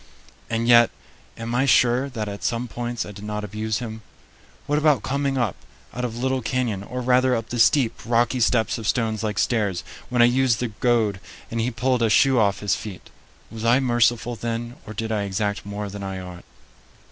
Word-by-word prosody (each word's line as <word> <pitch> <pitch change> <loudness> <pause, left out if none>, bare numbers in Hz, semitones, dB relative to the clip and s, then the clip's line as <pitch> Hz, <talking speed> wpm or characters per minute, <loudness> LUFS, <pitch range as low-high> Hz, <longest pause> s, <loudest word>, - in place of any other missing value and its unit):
And 115 0 -1
yet, 120 -1 +7 0.5
am 115 +1 -5
I 130 +3 +2
sure 125 +2 +4
that 110 -5 -4
at 100 0 -6
some 120 +1 -1
points 120 +1 -4
I - - -8
did 100 0 -11
not 105 0 -4
abuse 110 +2 -2
him? 110 -2 -6 0.6
What 145 +1 +1
about 150 -3 +3
coming 140 0 -1
up 120 -7 0 0.4
out 125 - -4
of 120 -2 -3
Little 130 +1 0
Canyon, 120 -4 -1
or 125 +5 -5
rather 125 +1 +3
up 115 -1 -4
the 120 - -3
steep, 125 0 +4
rocky 120 +2 +1
steps 115 -1 +2
of 110 - -5
stones 110 -4 0
like 105 -1 -2
stairs, 105 -7 0 0.3
when 125 -1 +4
I - - +8
used 125 -1 +2
the 125 - -1
goad, 110 -3 +1 0.3
and 115 0 -1
he 120 - 0
pulled 125 +1 0
a 115 - +3
shoe 130 +3 +4
off 100 -2 +2
his 105 -3 +1
feet? 100 -5 -7 0.4
Was 110 -1 -7
I 120 +3 +4
merciful 120 -2 +2
then, 115 +2 -4
or 110 - -7
did 110 +1 -3
I 105 -2 0
exact 100 +1 -2
more 100 0 -4
than 100 0 -7
I 95 -1 -4
ought? 90 -1 -9
115 Hz, 205 wpm, -23 LUFS, 105-125 Hz, 0.6 s, I